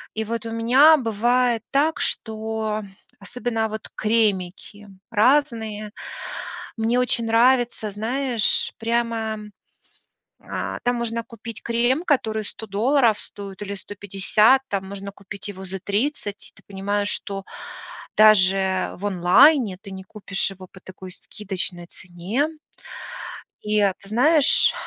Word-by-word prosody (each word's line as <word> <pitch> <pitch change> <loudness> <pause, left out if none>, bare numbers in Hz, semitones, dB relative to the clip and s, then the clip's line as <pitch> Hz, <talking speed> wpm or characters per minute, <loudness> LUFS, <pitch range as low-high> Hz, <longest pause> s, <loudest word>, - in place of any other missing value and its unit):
И 220 - -1
вот 230 +1 -4
у - - -5
меня 255 +8 +6
бывает 240 0 +1
так, 295 +3 +2
что 220 -1 -2 0.4
особенно 225 +1 -3
вот 215 0 -6
кремики 205 -2 -1 0.2
разные. 220 -3 +1 0.9
Мне 225 +2 +1
очень 245 -2 +2
нравится, 235 -1 +2
знаешь, 235 +2 0
прямо 230 -1 -1 1.0
а, - - -4
там 245 0 +1
можно 230 -1 -2
купить 230 0 -9
крем, 240 +6 +1
который 220 -8 +1
100 220 - -8
долларов 225 +2 +2
стоит 200 -1 -9
или 200 0 -4
150, 205 +5 +2
там 195 -1 -2
можно 200 0 -7
купить 200 +1 -7
его 190 -1 -8
за 190 +1 -5
30, 205 +1 -3
и - - -21
ты - - -20
понимаешь, 205 +1 -2
что 195 -1 -4 0.7
даже 190 -3 +4
в 195 - -7
онлайне 200 - +5
ты 200 -3 -11
не 190 0 -8
купишь 195 0 -2
его 185 -1 -11
по 185 - -14
такой 185 0 -11
скидочной 180 -2 -4
цене. 190 - -3 1.1
И 210 0 +1
ты 195 0 -1
знаешь, 285 +6 +4
215 Hz, 125 wpm, -23 LUFS, 200-235 Hz, 1.1 s, меня